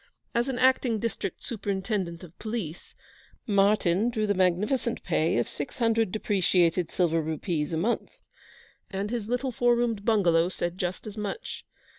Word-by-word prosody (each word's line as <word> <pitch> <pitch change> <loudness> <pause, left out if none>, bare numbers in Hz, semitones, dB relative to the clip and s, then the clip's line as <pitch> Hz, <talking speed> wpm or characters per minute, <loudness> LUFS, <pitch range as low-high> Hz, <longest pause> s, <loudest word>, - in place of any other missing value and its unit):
As 235 +1 +1
an 260 - -2
Acting 255 -2 +3
District 215 -4 -4
Superintendent 195 -5 -2
of 175 -1 -12
Police, 215 -8 -5 0.5
Martyn 200 -1 +3
drew 220 -3 0
the 205 - +2
magnificent 200 +7 +1
pay 160 -4 +1
of 120 - +1
six 145 - -6
hundred 225 -4 +2
depreciated 180 -5 +2
silver 165 -3 +1
rupees 155 0 -2
a 160 - -1
month, 215 +9 -1 0.7
and 200 +2 -3
his 235 -4 -2
little 250 +2 -1
four 240 0 +3
roomed 235 -4 0
bungalow 180 -6 +3
said 175 0 -3
just 180 0 -3
as 215 0 -8
much. 210 - -5
200 Hz, 150 wpm, -27 LUFS, 175-230 Hz, 0.7 s, Acting